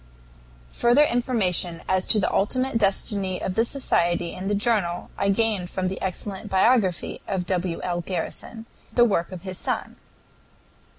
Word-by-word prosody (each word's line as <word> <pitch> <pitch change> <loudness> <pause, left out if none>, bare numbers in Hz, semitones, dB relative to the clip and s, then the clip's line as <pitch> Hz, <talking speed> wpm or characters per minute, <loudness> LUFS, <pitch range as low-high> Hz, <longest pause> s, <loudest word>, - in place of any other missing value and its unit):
Further 240 +5 +4
information 205 - +1
as 185 0 +1
to 215 - +3
the 195 - 0
ultimate 255 +4 +1
destiny 195 -2 0
of 185 - -3
the 225 - +3
society 175 -10 0
and 190 +2 -4
the 205 - +1
journal 200 -5 0
I 200 - 0
gained 200 -3 +1
from 185 0 -2
the 190 - -6
excellent 195 +2 -3
biography 190 -2 +2
of 185 -2 -2
W. 180 -2 -1
L. 175 -1 -1
Garrison, 190 +6 -5 0.3
the 240 +1 +5
work 195 -6 0
of 185 -1 -8
his 185 -1 -6
son. - - -3
195 Hz, 155 wpm, -24 LUFS, 180-225 Hz, 0.3 s, the